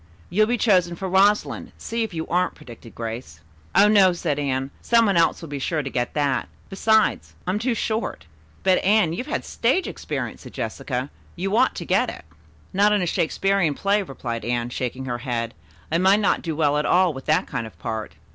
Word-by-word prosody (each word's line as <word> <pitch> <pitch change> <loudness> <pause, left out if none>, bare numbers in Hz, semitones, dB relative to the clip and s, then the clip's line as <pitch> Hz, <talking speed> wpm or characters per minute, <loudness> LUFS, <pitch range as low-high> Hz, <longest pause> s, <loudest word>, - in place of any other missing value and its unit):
"You'll 215 +3 +3
be 240 +1 +1
chosen 180 -6 +3
for 190 +3 -4
Rosalind, 195 +3 +2
see 230 +1 -3
if 225 - -1
you 160 -2 -4
aren't," 180 +2 0
predicted 115 -1 -13
Grace. 115 -8 -6 0.4
"Oh, 200 +2 +7
no," 200 -3 +5
said 160 -4 -2
Anne. 135 -1 -1
"Some 230 -1 +4
one 200 -3 +2
else 165 0 +2
will 165 - -7
be 145 -1 -4
sure 155 +2 -1
to 135 - -4
get 120 -1 -2
that. 140 -3 0 0.2
Besides, 220 +2 +2
I'm 185 +3 0
too 235 +1 0
short." 215 - -2 0.4
"But, 185 -1 +3
Anne, 200 -4 +3
you've 250 +9 -4
had - - -2
stage 265 +11 +1
experience," - - -5
said - - -12
Jessica. 130 +1 -3 0.2
"You 195 +4 -1
ought - - +3
to - - -5
get - - +2
it." - - -9 0.5
"Not 205 +2 +4
in 205 -3 +2
a - - 0
Shakespearian 175 -1 +1
play," 200 +5 +1
replied 120 - -5
Anne, 120 0 -1
shaking 130 +1 -3
her 120 -2 -3
head. 120 -3 -3 0.4
"I 165 - +2
might 190 +3 +5
not 205 - +2
do 165 -3 -3
well 150 -1 +2
at 150 - -1
all 180 -2 +4
with 135 -1 -9
that 160 +5 +3
kind 115 - -4
of 95 -7 -15
part." 110 +3 -5
170 Hz, 205 wpm, -23 LUFS, 130-200 Hz, 0.5 s, Oh